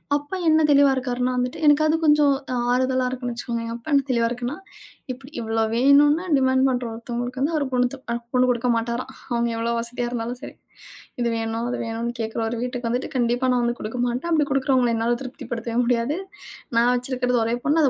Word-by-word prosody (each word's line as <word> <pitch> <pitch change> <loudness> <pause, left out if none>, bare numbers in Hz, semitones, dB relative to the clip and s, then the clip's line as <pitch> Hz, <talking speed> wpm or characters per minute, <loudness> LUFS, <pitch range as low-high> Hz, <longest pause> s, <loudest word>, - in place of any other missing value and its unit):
அப்பா 290 +6 -3
என்ன 315 0 +5
தெளிவா 280 -1 +6
இருக்கார்னா 250 0 -1
வந்துட்டு, 250 0 -2
எனக்காவது 310 +2 +5
கொஞ்சம் 295 -2 +5 0.2
அ - - 0 0.2
ஆறுதலா 255 0 +1
இருக்குன்னு 250 -1 -4
வச்சுக்கோங்க. 235 -1 -4
அப்பா 235 +6 -9
என்ன 275 -1 +4
தெளிவா 235 -2 +2
இருக்குன்னா, 245 +3 -4 0.6
இப்படி. 260 +2 -10
இவ்ளோ 225 0 0
வேணும்னு 290 +6 +5
டிமான்ட் 260 0 +3
பண்ற 245 -1 -1
ஒருத்தங்களுக்கு 245 +6 -3
ஒரு 285 - 0
பொண்ணு, 250 +2 0
அ - - 0 0.2
பொண்ணு 255 0 +4
கொடுக்க 245 +1 -1
மாட்டாராம். 235 +3 -3 0.2
அவங்க 235 0 +1
எவ்வளவு 235 +1 -1
வசதியா 240 +1 -3
இருந்தாலும் 240 +1 -4
சரி. - - -9 0.7
இது 240 - +1
வேணும், 225 +1 -2
அது 245 - -3
வேணும்னு 230 +1 -3
கேக்குற 220 +1 -3
ஒரு 235 +1 -3
வீட்டுக்கு 245 -1 -3
வந்துட்டு, 245 +4 -2
கண்டிப்பா 245 +2 +1
நான் 245 -1 +1
வந்து 240 0 -1
கொடுக்க 225 +3 -5
மாட்டேன். 250 +8 -3
அப்படி 300 -3 +3
கொடுக்கிறவங்கள 260 -3 +2
என்னால 235 +1 +1
திருப்திப்படுத்தவே 235 -2 -5
முடியாது. 245 +5 +1 0.6
நான் 240 +2 +4
வச்சிருக்கிறது 250 -1 0
ஒரே 230 +1 0
பொண்ணு. 315 +2 +3
அத 275 - +5
250 Hz, 185 wpm, -23 LUFS, 235-265 Hz, 0.7 s, தெளிவா